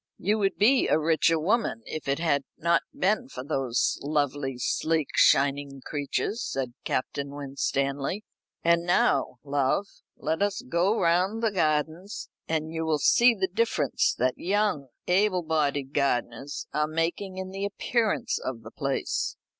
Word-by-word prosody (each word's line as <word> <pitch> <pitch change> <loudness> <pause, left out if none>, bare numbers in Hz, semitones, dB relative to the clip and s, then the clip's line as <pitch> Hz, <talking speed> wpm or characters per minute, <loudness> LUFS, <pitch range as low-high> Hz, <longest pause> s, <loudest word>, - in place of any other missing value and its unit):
"You 210 +3 0
would 195 -1 +1
be 250 +6 +4
a - - +3
richer 160 +1 +2
woman 175 - 0
if 155 - -6
it 140 0 +1
had 150 -4 +1
not 170 +1 +2
been 215 +7 0
for 125 - -7
those 135 -4 0
lovely, 145 -3 -1
sleek, 155 +4 0
shining 140 0 +3
creatures," 150 - -2
said 130 -3 -3
Captain 140 +2 -2
Winstanley. 140 +5 -2 0.4
"And 170 0 +3
now, 175 -6 +2
love, 140 +6 +1 0.3
let 160 +4 -2
us 205 +4 0
go 195 +3 +2
round 185 +6 +2
the 225 - +3
gardens, 160 +2 -1 0.2
and 160 0 -1
you 160 0 -2
will 160 -1 +1
see 235 +9 +5
the 190 -2 0
difference 195 - +1
that 125 +1 0
young 195 -7 0 0.2
able 185 0 +2
bodied 145 -3 0
gardeners 135 0 -1
are 150 0 +1
making 165 +4 -2
in 190 0 -5
the 195 +1 -5
appearance 215 +2 0
of 120 -3 -5
the 110 - -10
place." 140 -1 -2
160 Hz, 145 wpm, -27 LUFS, 140-195 Hz, 0.4 s, see